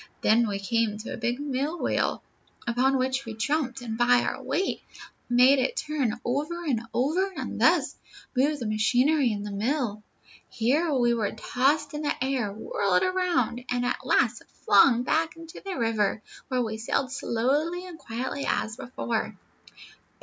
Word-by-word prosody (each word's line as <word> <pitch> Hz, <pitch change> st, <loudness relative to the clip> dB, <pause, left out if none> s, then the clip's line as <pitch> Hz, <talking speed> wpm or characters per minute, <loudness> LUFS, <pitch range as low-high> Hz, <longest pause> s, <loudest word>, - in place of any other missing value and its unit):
Then 230 Hz, +2 st, +4 dB
we 200 Hz, -1 st, -2 dB
came 215 Hz, +1 st, 0 dB
to 215 Hz, -, -6 dB
a -, -, -5 dB
big 240 Hz, +2 st, -1 dB
mill 290 Hz, +3 st, -2 dB
wheel, -, -, 0 dB, 0.4 s
upon 255 Hz, +3 st, +2 dB
which 260 Hz, +1 st, 0 dB
we 225 Hz, -3 st, -7 dB
jumped, 260 Hz, +2 st, -1 dB
and 225 Hz, -1 st, -5 dB
by 245 Hz, 0 st, +5 dB
our -, -, -3 dB
weight 385 Hz, -, -1 dB, 0.5 s
made 250 Hz, +3 st, +6 dB
it 475 Hz, -, 0 dB
turn 285 Hz, -, -1 dB
over 300 Hz, +8 st, -2 dB
and 250 Hz, -8 st, 0 dB
over, 335 Hz, +10 st, +1 dB
and -, -, -4 dB
thus -, -, +3 dB, 0.4 s
move 285 Hz, +4 st, +2 dB
the 245 Hz, -, -5 dB
machinery 245 Hz, +6 st, +2 dB
in 205 Hz, -1 st, -3 dB
the 205 Hz, -, -5 dB
mill. 215 Hz, 0 st, -1 dB, 0.5 s
Here 280 Hz, +8 st, +1 dB
we 240 Hz, -4 st, +3 dB
were 220 Hz, -4 st, 0 dB
tossed 280 Hz, +7 st, 0 dB
in 300 Hz, -, -4 dB
the 295 Hz, -, 0 dB
air, 260 Hz, -6 st, -1 dB
whirled 200 Hz, -3 st, 0 dB
around, 360 Hz, -9 st, 0 dB
and 245 Hz, 0 st, 0 dB
at 245 Hz, -, -2 dB
last 240 Hz, -2 st, +2 dB, 0.2 s
flung 235 Hz, +4 st, +6 dB
back 320 Hz, +4 st, 0 dB
into 330 Hz, 0 st, -11 dB
the 390 Hz, -2 st, -4 dB
river, 220 Hz, -3 st, 0 dB, 0.2 s
where 255 Hz, -2 st, 0 dB
we 220 Hz, -1 st, -4 dB
sailed 255 Hz, +3 st, -1 dB
slowly 290 Hz, +9 st, 0 dB
and 345 Hz, -3 st, -10 dB
quietly 255 Hz, +3 st, -4 dB
as 220 Hz, +1 st, -1 dB
before. 240 Hz, -4 st, -3 dB
250 Hz, 165 wpm, -27 LUFS, 225-290 Hz, 0.5 s, made